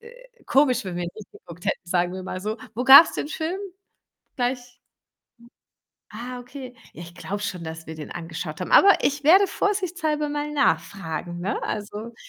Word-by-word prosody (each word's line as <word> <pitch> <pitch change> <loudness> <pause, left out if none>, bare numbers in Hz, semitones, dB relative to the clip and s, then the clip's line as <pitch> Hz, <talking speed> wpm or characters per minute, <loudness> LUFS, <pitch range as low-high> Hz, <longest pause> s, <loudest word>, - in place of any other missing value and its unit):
äh, - - -17
komisch, 260 -4 +3
wenn 180 -2 -5
wir 175 - -2
ihn - - -3
nicht 215 -2 -12
geguckt 175 0 -13
hätten, - - -1
sagen 175 0 0
wir 185 - -6
mal 185 0 -6
so. 215 +3 -3 0.2
Wo 245 - -2
gab's 275 +5 +9
den 295 - -3
Film 325 +4 -3 0.8
gleich? 245 0 -2 1.4
Ah 245 +3 -7
okay, 250 0 -10 0.2
ja, 170 - -9
ich 170 0 -12
glaube 195 +3 -5
schon, 180 -4 -4
dass 160 0 -8
wir 160 - -7
den 155 -1 -9
angeschaut 165 -1 -6
haben. - - -5
Aber 400 -1 +8
ich 290 +1 0
werde 375 +6 +7
vorsichtshalber 350 -8 -1
mal 295 0 -3
nachfragen, 175 - -1
ne? 195 +4 -2
Also, 210 +2 -5
230 Hz, 175 wpm, -24 LUFS, 175-295 Hz, 1.4 s, gab's